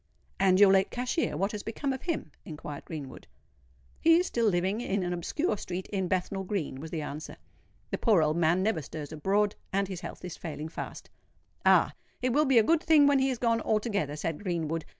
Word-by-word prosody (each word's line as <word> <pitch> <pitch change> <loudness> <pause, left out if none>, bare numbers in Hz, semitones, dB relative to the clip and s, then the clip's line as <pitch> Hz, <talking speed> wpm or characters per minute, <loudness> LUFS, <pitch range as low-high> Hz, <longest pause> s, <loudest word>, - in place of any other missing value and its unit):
"And 190 -1 +4
your 200 -1 +8
late 195 0 +4
cashier—what 245 - -1
has 210 - -5
become 265 +6 -3
of 265 - -6
him?" 325 - -3
inquired 150 -2 -8
Greenwood. 145 -6 -8 0.7
"He 330 0 +6
is 360 - +2
still 235 -9 +1
living 190 +3 +1
in 200 -4 -1
an 175 0 -1
obscure 215 - -1
street 180 +1 -4
in 190 -3 -1
Bethnal 190 +2 -1
Green," 180 -9 -3
was 160 +3 -7
the 160 -2 -3
answer. 150 +1 -7 0.5
"The - - -2
poor 205 -9 +4
old 155 0 +1
man 170 +2 +3
never 200 -6 +1
stirs 150 +1 -7
abroad; 200 +6 +1 0.2
and 195 0 +1
his 185 -2 -6
health - - -8
is 180 - -6
failing 155 -1 -6
fast." - - -7 0.6
"Ah! - - +5 0.3
it 250 -1 0
will 300 +3 +4
be 265 -3 +4
a 225 - +7
good 325 +7 +3
thing 315 -4 +5
when 285 -1 +4
he 265 0 +2
is 255 - -1
gone 230 -1 +1
altogether," 210 - 0
said 155 +2 -3
Greenwood. 165 -4 -2
190 Hz, 205 wpm, -29 LUFS, 160-230 Hz, 0.7 s, your